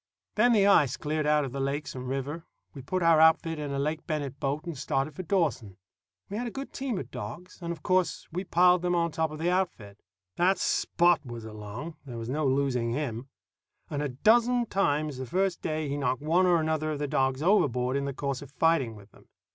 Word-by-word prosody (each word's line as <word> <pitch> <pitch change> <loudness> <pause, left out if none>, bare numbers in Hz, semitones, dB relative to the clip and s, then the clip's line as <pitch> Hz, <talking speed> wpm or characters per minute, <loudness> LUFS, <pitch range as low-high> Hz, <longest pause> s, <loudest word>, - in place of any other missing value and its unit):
When 240 +3 +4
the 205 -3 +4
ice 150 -10 +4
cleared 155 0 -2
out 150 -1 +3
of 130 - -6
the 135 - -5
lakes 140 +2 -2
and 130 -1 -6
river, 135 +5 -4 0.3
we 140 - -8
put 180 +7 -2
our 165 -1 +5
outfit 160 0 +4
in 145 -1 -4
a 140 - -2
Lake 155 +3 -2
Bennet 145 -3 -3
boat 145 +3 -2
and 170 -2 -5
started 135 +2 -1
for - - -4
Dawson. 150 - -1 0.5
We 205 - -5
had 245 +2 -2
a - - -2
good 270 +4 -7
team 265 -6 -3
of - - -6
dogs, 120 - -8
and 170 0 -3
of 160 -3 -7
course 185 -2 +1
we 180 +3 -3
piled 180 -1 +4
them 175 0 0
on 170 -1 +1
top 160 0 -2
the 170 +3 0
outfit. 120 - -2 0.4
That 185 +2 +3
Spot 175 -2 +2
was 120 -4 -8
along 110 +9 -8
there 125 -4 -7
was 115 0 -5
no 150 +2 0
losing 130 -3 +1
him; 130 -2 -4 0.6
and 145 -1 -2
a 145 - -1
dozen 235 - +3
times, 155 - 0
the 130 - -5
first 185 +5 0
day, 155 -1 -2
he 140 +1 -2
knocked 130 -1 -1
one 175 +4 +3
or 175 -2 +4
another 155 0 0
of - - -4
the 145 0 -2
dogs 135 +1 0
overboard 130 - +2
in 140 0 -1
the 140 - -2
course 140 -2 -3
of 140 - -10
fighting 140 -6 +1
with 105 0 -15
them. - - -21
150 Hz, 220 wpm, -28 LUFS, 135-175 Hz, 0.6 s, our